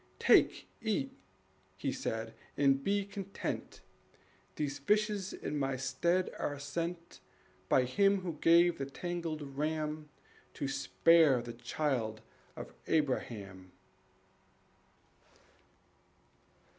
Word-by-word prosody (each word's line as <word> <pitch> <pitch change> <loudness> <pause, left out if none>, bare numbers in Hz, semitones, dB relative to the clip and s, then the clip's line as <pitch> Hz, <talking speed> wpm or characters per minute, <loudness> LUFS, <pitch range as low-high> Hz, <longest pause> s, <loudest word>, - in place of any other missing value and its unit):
"Take, - - +4 0.2
eat," 210 -12 0 0.7
he 135 +8 -1
said, 115 -2 -3 0.2
"and 135 -1 +3
be 200 0 +1
content; 200 -1 -5 0.7
These 145 -1 -2
fishes 210 +3 +1
in 150 - -4
my 135 -1 0
stead 170 +8 +1
are 145 - -2
sent 170 +4 -4 0.5
By 130 - +5
Him 195 +10 +3
who 170 -5 -5
gave 170 0 +5
the 135 - -2
tangled 165 0 -4
ram 150 +2 -3 0.5
To 140 - -2
spare 135 - +4
the 120 -1 -6
child 120 -2 -2 0.3
of - - -8
Abraham." 105 - -1
150 Hz, 95 wpm, -33 LUFS, 135-175 Hz, 0.7 s, By